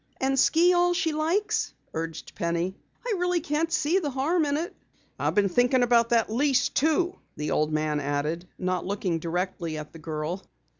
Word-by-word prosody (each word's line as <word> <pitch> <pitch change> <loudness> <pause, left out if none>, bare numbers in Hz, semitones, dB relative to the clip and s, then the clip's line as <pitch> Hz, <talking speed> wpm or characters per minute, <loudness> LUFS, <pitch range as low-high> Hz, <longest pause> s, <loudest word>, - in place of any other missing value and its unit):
"And 270 0 +1
ski 345 +6 +5
all 350 0 +3
she 340 -3 0
likes," 330 +7 0 0.2
urged 165 0 -5
Penny. 170 +2 -1 0.3
"I 480 - 0
really 360 0 +1
can't 320 +1 -1
see 345 +1 +2
the 305 -6 -2
harm 300 +5 +1
in 285 0 0
it." 340 +6 -4 0.4
"I - - +1
been 205 -1 +3
thinkin' 245 +6 +3
about 235 -1 +4
that 230 -2 +3
lease, 270 +1 +2
too," 330 +4 +1 0.2
the 150 0 -3
old 155 0 +1
man 155 -1 0
added, 145 +5 -2
not 185 -1 -1
looking 185 -3 -1
directly 170 -1 -3
at 150 0 -8
the 165 - -10
girl. 155 +4 -4
240 Hz, 180 wpm, -26 LUFS, -, 0.4 s, ski